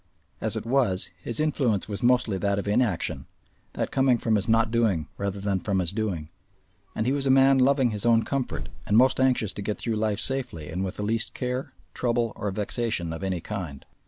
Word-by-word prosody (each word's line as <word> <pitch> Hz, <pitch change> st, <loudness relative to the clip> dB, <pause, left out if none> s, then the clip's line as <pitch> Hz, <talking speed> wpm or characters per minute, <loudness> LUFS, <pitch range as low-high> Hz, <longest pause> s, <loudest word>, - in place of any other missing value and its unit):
As -, -, -1 dB
it -, -, -5 dB
was, 115 Hz, -7 st, +1 dB
his 115 Hz, -, -2 dB
influence 135 Hz, -9 st, +1 dB
was 105 Hz, 0 st, -5 dB
mostly 120 Hz, -5 st, +2 dB
that 100 Hz, 0 st, +1 dB
of 100 Hz, -, -3 dB
inaction, 105 Hz, -3 st, 0 dB, 0.5 s
that -, -, -2 dB
coming 130 Hz, -2 st, +3 dB
from 115 Hz, -1 st, 0 dB
his 105 Hz, +1 st, -1 dB
not 115 Hz, 0 st, +3 dB
doing 110 Hz, -10 st, +1 dB
rather 100 Hz, 0 st, -3 dB
than 100 Hz, -1 st, 0 dB
from 100 Hz, +1 st, -1 dB
his 90 Hz, -2 st, 0 dB
doing. 100 Hz, -8 st, -3 dB, 0.7 s
And 110 Hz, -, -1 dB
he 130 Hz, -, +2 dB
was 140 Hz, 0 st, 0 dB
a -, -, +2 dB
man 135 Hz, 0 st, +6 dB
loving 130 Hz, -2 st, +3 dB
his 105 Hz, -2 st, -4 dB
own 115 Hz, -1 st, +4 dB
comfort 135 Hz, -3 st, -3 dB, 0.2 s
and 105 Hz, -, +3 dB
most 130 Hz, +2 st, +4 dB
anxious 130 Hz, -6 st, +2 dB
to -, -, -6 dB
get 105 Hz, +1 st, -2 dB
through 115 Hz, -2 st, -2 dB
life 105 Hz, -1 st, 0 dB
safely 125 Hz, -, -3 dB
and 90 Hz, +3 st, -2 dB
with 95 Hz, -, -4 dB
the 105 Hz, -, -4 dB
least 115 Hz, +2 st, 0 dB
care, 125 Hz, +1 st, -3 dB, 0.2 s
trouble, 120 Hz, -2 st, 0 dB
or 105 Hz, -, -3 dB
vexation 105 Hz, -3 st, -1 dB
of 80 Hz, -, -6 dB
any 95 Hz, -3 st, -1 dB
kind. 85 Hz, -9 st, -6 dB
110 Hz, 210 wpm, -26 LUFS, 100-125 Hz, 0.7 s, man